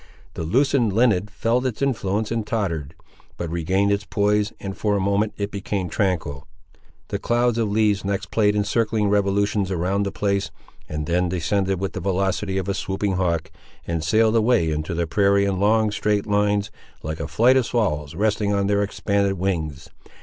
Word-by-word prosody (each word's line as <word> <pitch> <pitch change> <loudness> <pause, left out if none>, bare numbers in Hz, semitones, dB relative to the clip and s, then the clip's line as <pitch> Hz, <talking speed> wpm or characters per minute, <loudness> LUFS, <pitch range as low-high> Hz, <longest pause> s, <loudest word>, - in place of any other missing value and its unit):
The - - -6
loosened 120 - +2
linen 105 -4 +3
felt 115 +4 0
its 125 -4 -2
influence 110 -6 -1
and 115 -1 0
tottered; 85 -10 -3 0.4
but 85 -2 -4
regained 95 +4 +1
its 100 0 0
poise, 105 0 +1
and, 95 -1 -5
for 105 -1 0
a - - +1
moment, 100 +2 +1
it 100 0 -3
became 100 -2 -3
tranquil. 80 -8 -2 0.6
The - - -2
cloud 120 0 +1
of 110 -2 +1
leaves 105 -1 +2
next 100 0 -3
played 105 -2 +2
in 105 - +2
circling 110 -1 0
revolutions 100 0 +1
around 95 +2 0
the 100 -1 -1
place, 100 -1 -1 0.4
and 75 -1 -3
then 90 +2 +1
descended 95 +2 0
with 95 0 -3
the - - -4
velocity 95 +1 -1
of 95 -1 -2
a 100 - 0
swooping 95 0 -2
hawk, 85 -4 -1 0.3
and 85 -2 -2
sailed 110 +7 +3
away 110 -7 +3
into 75 +3 -3
the 85 0 0
prairie 100 +3 +3
in 95 -2 -1
long 110 +1 +3
straight 105 -1 0
lines, 105 0 +1 0.3
like 80 +1 -4
a 75 - -3
flight 115 +11 +4
of 130 -3 +2
swallows 75 -10 -1
resting 105 +1 +1
on 100 -1 +1
their 100 0 +2
expanded 100 -1 0
wings. 80 -6 -3
100 Hz, 180 wpm, -23 LUFS, 90-105 Hz, 0.6 s, flight